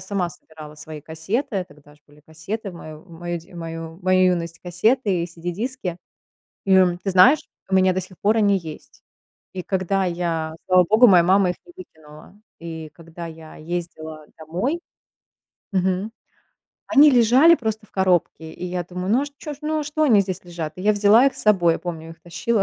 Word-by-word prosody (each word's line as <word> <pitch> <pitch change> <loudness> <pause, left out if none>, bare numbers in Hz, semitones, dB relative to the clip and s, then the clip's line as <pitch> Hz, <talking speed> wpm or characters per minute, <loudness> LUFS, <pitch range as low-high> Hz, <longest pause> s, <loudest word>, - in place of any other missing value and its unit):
сама 190 -1 -2
собирала 155 -2 -13
свои 150 0 -9
кассеты. 185 - -3
Тогда 145 -1 -19
ж - - -26
были 145 0 -21
кассеты, 160 +8 -6
в 175 - -13
мою 155 -2 -11
мою 175 +1 -5
д 170 - -18
мою 165 -1 -7
мою 185 0 +4
юность 170 -1 -4
кассеты 190 +2 0
и - - -3
CD-диски. 175 +4 -5 0.7
И 190 -1 +5 0.3
ты 195 - -1
знаешь, 190 +11 +6 0.3
у 190 - -1
меня 185 0 +4
до 185 - 0
сих 185 0 -12
пор 215 +2 +2
они 205 -2 +3
есть. 160 -4 -9 0.5
И 185 -1 -5
когда 190 0 0
я- 170 -3 -2
слава 185 -1 +5
богу, 225 +4 +6
моя 175 -4 +6
мама 190 0 +3
их 180 - -5
не 350 - -15
выкинула- 160 - -15 0.2
и 160 -2 -7
когда 165 +2 -10
я 160 -1 -11
ездила 160 -2 -6
домой 185 - -3 0.9
Мгм, 190 +2 0 0.8
они 295 -1 +7
лежали 255 +6 +6
просто 220 -6 -4
в - - -31
коробке, 180 -4 0
и - - -8
я 180 0 -3
думаю: 180 +2 -5
"Ну 250 - +4
а - - -1
ж - - -7
чё 300 -1 -6
ж - - -20
ну 310 +1 -1
а - - -4
что 300 +2 -2
они 235 -9 +5
здесь 185 -2 -4
лежат?" 170 -3 -6
И 185 - -8
я 210 - +3
взяла 210 +5 +5
их 275 - +1
с - - -4
собой, 175 -6 +4
я - - -4
помню, 165 -2 -7
их 165 0 -14
тащила 175 +6 -1
180 Hz, 195 wpm, -22 LUFS, 165-205 Hz, 0.9 s, они